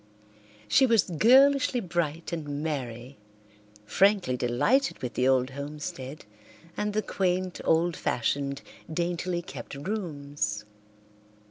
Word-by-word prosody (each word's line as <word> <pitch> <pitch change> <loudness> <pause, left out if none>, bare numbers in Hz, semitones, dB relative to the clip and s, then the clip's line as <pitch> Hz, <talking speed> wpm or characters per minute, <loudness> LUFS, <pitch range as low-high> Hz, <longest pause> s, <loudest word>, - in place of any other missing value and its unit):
She 265 - +5
was 230 -4 +4
girlishly 255 - +4
bright 170 -4 -2
and 150 -3 -4
merry, 130 -4 -5 0.7
frankly 195 - +3
delighted 125 - +1
with 125 - -3
the 125 - +1
old 130 0 +3
homestead 140 -1 -7 0.5
and 210 0 -2
the 215 0 0
quaint, 185 -1 -1
old 165 +1 +2
fashioned, 140 +3 -1 0.3
daintily 175 +1 -2
kept - - -8
rooms. 145 - -3
160 Hz, 105 wpm, -27 LUFS, 135-190 Hz, 0.7 s, She